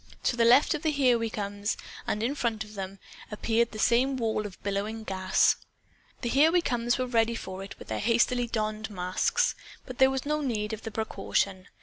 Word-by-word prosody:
To - - +1
the 235 -1 +3
left 250 +5 +6
of 305 - -3
the 315 - +1
Here 260 -5 +3
We 230 0 -1
Comes, 205 -1 -3 0.3
and 210 - -1
then 235 - +2
in - - -2
front 230 -6 -1
of 210 0 -13
them, 195 -1 -6 0.3
appeared 225 +2 +1
the 215 - -8
same 250 +5 +3
wall 220 -3 -1
of 190 - -14
billowing 205 +3 -2
gas. 190 -2 +2 0.6
The 240 - -1
Here 290 +6 +5
We 355 - +4
Comes 240 -6 0
were 255 - 0
ready 235 -2 +1
for 190 -3 -6
it 195 - -10
with - - -12
their - - -2
hastily 240 +2 +2
donned 215 -1 -2
masks. 190 - 0 0.3
But 255 -2 -9
there 265 0 +7
was 265 0 -2
no 300 +1 0
need 220 -6 -2
of 220 - -5
the - - -5
precaution. 200 -3 -2
225 Hz, 215 wpm, -28 LUFS, 210-250 Hz, 0.6 s, there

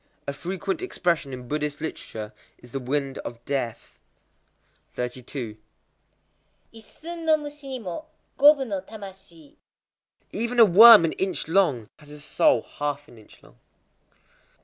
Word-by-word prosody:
A 140 - -2
frequent 190 - -4
expression 175 - -1
in 125 -1 -8
Buddhist 150 +1 -2
literature 110 -8 -6 0.2
is 125 - -17
"the 135 - -3
Wind 135 +1 -2
of 120 0 -9
Death." 130 -5 -4 1.0
32.—Issun 130 - -10
no 315 -1 +4
mushi 295 -1 -7
ni 265 -1 -4
mo, 210 - -7 0.3
gobu 290 -1 +6
no 200 -5 -3
tamashii. 190 -6 -12 0.7
Even 235 +3 -2
a 230 - +10
worm 215 0 +9
an 160 - 0
inch 190 -4 -2
long 160 - +2
has 150 -1 -16
a 150 0 -10
soul 145 - +2
half 145 0 -5
an 120 - -16
inch 110 - -19
long. - - -21
165 Hz, 130 wpm, -25 LUFS, 135-220 Hz, 1.0 s, a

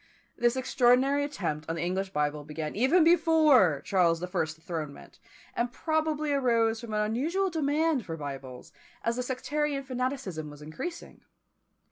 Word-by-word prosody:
This 240 +1 +2
extraordinary 260 +2 +3
attempt 165 - -4
on 165 - -1
the 165 - -3
English 190 +2 -1
Bible 150 -2 -1
began 150 +1 -5
even 270 - +4
before 310 - +5
Charles 170 -4 +2
the 180 - -3
First's 170 -4 -2
dethronement, 160 -3 -7 0.4
and 240 0 -1
probably 310 0 -1
arose 230 -5 +2
from 225 -3 -5
an 210 - +1
unusual 315 - 0
demand 310 -2 +1
for 165 -1 -4
Bibles, 135 -4 -8 0.3
as 230 +1 0
the - - 0
sectarian 275 +3 -2
fanaticism 255 - -3
was 145 0 -12
increasing. 245 - -7
235 Hz, 145 wpm, -28 LUFS, -, 0.4 s, before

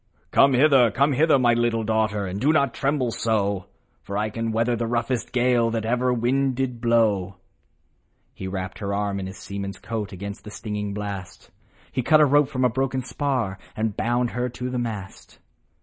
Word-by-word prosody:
" - - -39
Come 135 0 +5
hither! 130 -2 +5
come 140 +7 +2
hither! 150 +2 +4
my 120 -2 +4
little 120 -1 +1
daughter 110 -2 0
And 95 +2 -4
do 145 - +4
not 140 -5 +2
tremble 135 -3 0
so; 100 -4 -1 0.3
For 100 - -5
I 105 +1 -1
can 115 +1 -2
weather 115 +2 +1
the 115 0 -2
roughest 120 +1 -1
gale 125 -2 +2
That 115 -1 -2
ever 125 +2 +1
wind 130 +2 +1
did 125 -2 -2
blow." 110 -5 +2 1.0
He 95 - -6
wrapped 95 -1 -5
her 100 -2 -4
warm 100 0 -1
in 95 - -4
his 95 -1 -9
seaman's 100 0 -6
coat, 105 -3 -4
Against 100 +2 -7
the 105 - -9
stinging 105 -1 -4
blast; 100 -3 -6 0.4
He 130 - -1
cut 155 +5 +5
a 150 - +7
rope 145 0 +4
from 130 -3 0
a - - +7
broken 130 +1 -1
spar, 125 -8 -2 0.2
And 110 -1 -1
bound 120 +1 0
her 125 +1 -2
to 125 +1 -5
the 125 - -1
mast. 105 -5 -6
115 Hz, 195 wpm, -24 LUFS, 105-125 Hz, 1.0 s, a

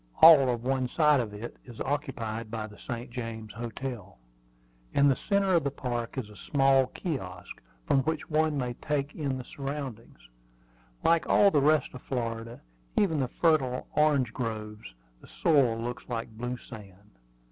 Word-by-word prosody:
All 155 -5 +9
of 120 -1 -1
one 130 0 0
side 150 +1 +4
of 115 -4 -2
it 105 +3 -8
is 120 -3 -12
occupied 115 -6 -3
by 110 -1 -4
the 105 -1 -13
St. 120 0 -6
James 115 -3 -6
Hotel. 120 - -6 0.8
In 140 - +5
the 135 - +4
centre 200 +2 +1
of 170 - +4
the 140 - +1
park 125 -3 -4
is 125 -5 -3
a 105 - -14
small 135 +1 +3
kiosk, 95 - -6 0.2
from 135 - +3
which 155 +3 -2
one 155 -1 +1
may 125 -2 -2
take 145 +2 -2
in 140 -4 -2
the 130 - -6
surroundings. 135 - -7 0.8
Like 165 0 +3
all 200 -1 +6
the 145 - +3
rest 150 0 +3
of 125 - -9
Florida, 115 -2 -4 0.4
even 165 -7 +3
the 130 - +1
fertile 130 -4 +1
orange 145 -6 +3
groves, 105 - -5 0.3
the - - -15
soil 135 -8 +2
looks 120 +2 -5
like 115 -1 -3
blue 120 +2 -4
sand. 100 -4 -13
125 Hz, 165 wpm, -29 LUFS, 115-145 Hz, 0.8 s, All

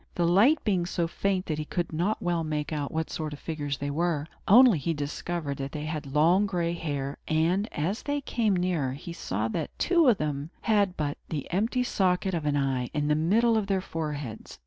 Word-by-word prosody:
The 175 - +1
light 205 - +5
being 185 -5 +1
so 175 -2 0
faint, 190 +2 -1
he 155 -1 -1
could 170 +2 -3
not 180 +7 0
well 175 -2 0
make 155 0 -2
out 145 -2 -2
what 160 0 -2
sort 155 -3 -4
of 145 - -9
figures 145 -4 -3
they 145 0 -3
were; 160 -1 0 0.2
only 235 - +7
he 165 +4 -1
discovered 145 0 -3
that 135 0 -5
they 150 -1 -4
had 155 -2 -4
long 175 +7 +4
gray 170 -3 -1
hair; 145 -4 -4
and, 170 +7 +1
as 180 +10 -2
they 285 0 -1
came 230 -7 0
nearer, 175 -8 0
he 160 +5 -7
saw 110 - -2
that 155 +6 -4
two 340 -4 +3
of 235 -5 +5
them 150 -1 -3
had 205 -4 +2
but 145 -2 -2
the 150 -4 -3
empty 225 +7 +1
socket 190 -4 +1
of 160 -3 -1
an 145 -1 +2
eye, 130 -3 0
in 145 0 0
the - - +4
middle 220 +9 +3
of 205 - -4
their 195 -1 +1
foreheads. 150 - -5
165 Hz, 210 wpm, -27 LUFS, 150-190 Hz, 0.2 s, only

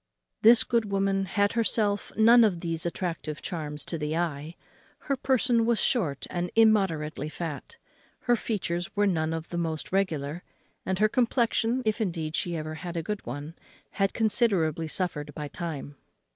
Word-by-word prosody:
This 230 +1 +8
good 230 -4 0
woman 195 0 +1
had 200 +2 +1
herself 215 -3 +1
none 230 +2 +7
of 185 -6 +1
these 165 -1 0
attractive 165 -4 -4
charms 150 -4 -5
to 165 - -4
the 150 +1 -2
eye. 160 -1 -3 0.4
Her 280 - -2
person 250 -3 +2
was 230 -1 +2
short 160 - +1
and 175 0 -2
immoderately 190 -10 +2
fat; 165 - -6 0.4
her 240 - +3
features 180 -7 -3
were 205 0 +3
none 160 -5 0
of 165 0 -5
the 175 - -3
most 160 -2 -3
regular; 170 -5 -1 0.5
and 190 0 0
her 215 +2 +4
complexion 240 0 +1
(if 220 +1 0
indeed 165 -6 -2
she 170 -2 -1
ever 155 0 -5
had 170 +2 -6
a 165 - -2
good 210 +4 -4
one) 145 +6 -6 0.4
had 195 -1 0
considerably 195 -8 +1
suffered 150 -4 -3
by 150 -2 -4
time. 145 -2 -6
175 Hz, 160 wpm, -27 LUFS, 160-215 Hz, 0.5 s, This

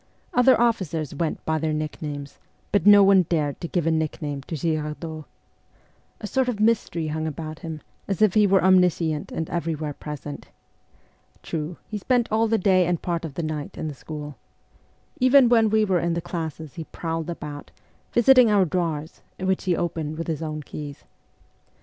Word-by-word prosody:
Other 250 0 +5
officers 185 - 0
went 155 +2 -3
by 160 0 0
their 155 0 -1
nicknames, 150 -2 -5 0.3
but 205 -2 +2
no 205 -1 +9
one 195 -1 +6
dared 150 -4 -1
to 170 - -3
give 170 -1 -1
a 165 - +2
nickname 150 -2 -2
to 165 - -4
Girardot. 155 0 -3 0.9
A - - -6
sort 255 +5 0
of 225 -4 -3
mystery 210 -7 +1
hung 155 +1 -2
about 155 +1 -6
him, 160 -3 -7 0.3
as 195 -4 -2
if 215 -4 +4
he 210 -1 +5
were 195 0 +3
omniscient 180 -5 +3
and 160 - -3
everywhere 160 -3 -2
present. 145 0 -8 1.0
True, 160 +1 -4
he 210 - -4
spent 245 +2 +1
all 220 +1 +3
the 225 +1 +2
day 185 -3 +3
and 175 -2 0
part 170 -2 -2
of 145 -4 -8
the 170 - -3
night 155 -2 -4
in 155 - -3
the 150 - -4
school. 150 +1 -8 0.8
Even 255 -1 +6
when 225 -2 +4
we 215 0 +3
were 185 -3 +2
in 170 0 0
the - - 0
classes 160 -3 -5
he 165 - -7
prowled 165 0 -4
about, 150 -3 -7 0.4
visiting 250 0 +6
our 200 -3 +4
drawers, 160 -2 -3 0.2
which 190 0 -1
he 180 -2 +2
opened 160 -3 -3
with 165 - -3
his 160 -2 -3
own 155 -1 -4
keys. 145 0 -8
165 Hz, 180 wpm, -24 LUFS, 155-195 Hz, 1.0 s, no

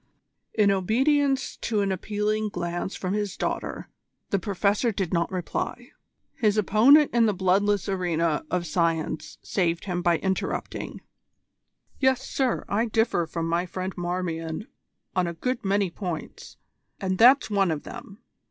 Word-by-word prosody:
In 205 -2 +4
obedience 265 +8 +1
to 215 -3 -1
an 200 -1 0
appealing 210 +3 -1
glance 175 0 -3
from 185 0 -3
his 205 -2 -2
daughter, - - -3 0.4
the 200 - +2
Professor 200 +5 +1
did 190 -4 -3
not 170 +1 +1
reply. 180 -2 -4 0.4
His 215 -2 +1
opponent 245 +9 +6
in 235 -1 +4
the 210 - +1
bloodless 195 +2 +2
arena 170 -5 0
of 180 -1 -1
Science 165 -2 -1
saved 170 -3 0
him 180 -2 -2
by 175 -1 +3
interrupting: 190 +1 -3 1.0
"Yes, 265 -1 +2
sir. 260 -3 0
I 220 +4 +1
differ 220 -6 +1
from 165 0 -3
my 170 +2 0
friend 185 +1 -4
Marmion 175 -1 -3 0.5
on 180 -1 +2
a 170 - -4
good 250 +8 -2
many 195 -2 +1
points, 175 -3 -6 0.4
and 185 -1 -2
that's 250 0 +6
one 195 -3 +3
of 155 -2 -2
them. 200 +5 -10
195 Hz, 145 wpm, -26 LUFS, 175-215 Hz, 1.0 s, opponent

